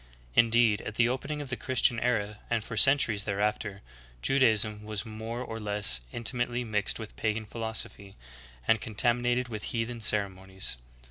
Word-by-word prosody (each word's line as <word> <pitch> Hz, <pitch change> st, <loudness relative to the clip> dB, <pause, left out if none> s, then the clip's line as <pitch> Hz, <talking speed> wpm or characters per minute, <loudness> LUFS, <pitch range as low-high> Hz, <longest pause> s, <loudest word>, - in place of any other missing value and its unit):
^ -, -, -25 dB, 0.3 s
Indeed, 115 Hz, -, +4 dB
at 110 Hz, -, -7 dB
the 120 Hz, +1 st, +4 dB
opening 140 Hz, +4 st, -3 dB
of 140 Hz, -2 st, -7 dB
the -, -, 0 dB
Chris 130 Hz, 0 st, 0 dB
tian 120 Hz, -3 st, +4 dB
era 105 Hz, -3 st, -1 dB
and 115 Hz, -2 st, 0 dB
for 115 Hz, -, -7 dB
centuries 110 Hz, -3 st, +5 dB
thereafter, 105 Hz, -1 st, -2 dB, 0.4 s
Judaism 110 Hz, -, +3 dB
was 105 Hz, 0 st, -4 dB
more 110 Hz, +2 st, -6 dB
or 115 Hz, -2 st, -6 dB
less 105 Hz, -, +1 dB
intimately 120 Hz, +1 st, -1 dB
mixed 105 Hz, -3 st, -1 dB
with 110 Hz, -2 st, -9 dB
pagan 110 Hz, 0 st, -1 dB
philosophy, 110 Hz, -3 st, -4 dB, 0.5 s
and 110 Hz, -1 st, +3 dB
contam 120 Hz, +3 st, +1 dB
inated 120 Hz, +1 st, 0 dB
with 110 Hz, -3 st, -5 dB
heathen 115 Hz, 0 st, -3 dB
ceremonies. 95 Hz, -, 0 dB
110 Hz, 160 wpm, -29 LUFS, 105-120 Hz, 0.5 s, centuries